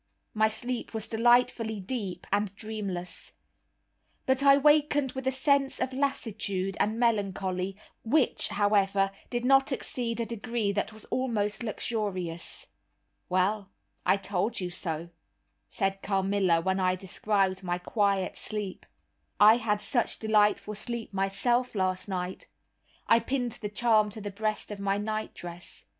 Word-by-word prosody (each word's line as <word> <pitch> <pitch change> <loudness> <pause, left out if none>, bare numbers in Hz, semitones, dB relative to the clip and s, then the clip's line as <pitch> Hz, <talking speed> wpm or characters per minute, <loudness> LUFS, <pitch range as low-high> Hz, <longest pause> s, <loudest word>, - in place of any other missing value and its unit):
My 215 0 +4
sleep 235 +2 -3
was 220 -1 -2
delightfully 230 -1 +3
deep 195 -2 -4
and 205 -1 0
dreamless. 200 -5 -5 0.9
But 265 0 +2
I 275 0 +7
wakened 295 -2 +3
with 265 0 -5
a - - +3
sense 275 +1 +2
of 260 0 -1
lassitude 215 -8 -1
and 215 +2 +1
melancholy, 195 -4 0 0.3
which, 265 +4 +2
however, 200 -1 +2 0.2
did 240 0 -2
not 270 +1 +5
exceed 240 -3 -2
a 230 - 0
degree 230 -1 -2
that 205 +2 -1
was 215 0 -12
almost 215 -5 0
luxurious. 200 -7 -3 0.6
"Well, 190 +2 +1 0.3
I - - +4
told 200 +3 -2
you 180 -2 -3
so," 170 -2 -4 0.6
said 195 0 -1
Carmilla, 195 -3 +2
when 190 +2 0
I 185 -1 +2
described 190 +1 0
my 175 -2 -1
quiet 195 0 0
sleep, 210 -3 -5 0.5
"I 215 +2 +8
had 210 -3 0
such 235 +3 0
delightful 210 -1 +2
sleep 230 0 -5
myself 235 +6 +1
last 185 0 -1
night; 185 -1 -4 0.6
I 230 - +5
pinned 245 +1 -1
the 210 - -5
charm 215 -1 +3
to 210 - -7
the 205 0 -5
breast 215 +1 -2
of 205 - -6
my 200 0 0
nightdress. 205 -5 -5
210 Hz, 135 wpm, -28 LUFS, 195-235 Hz, 0.9 s, I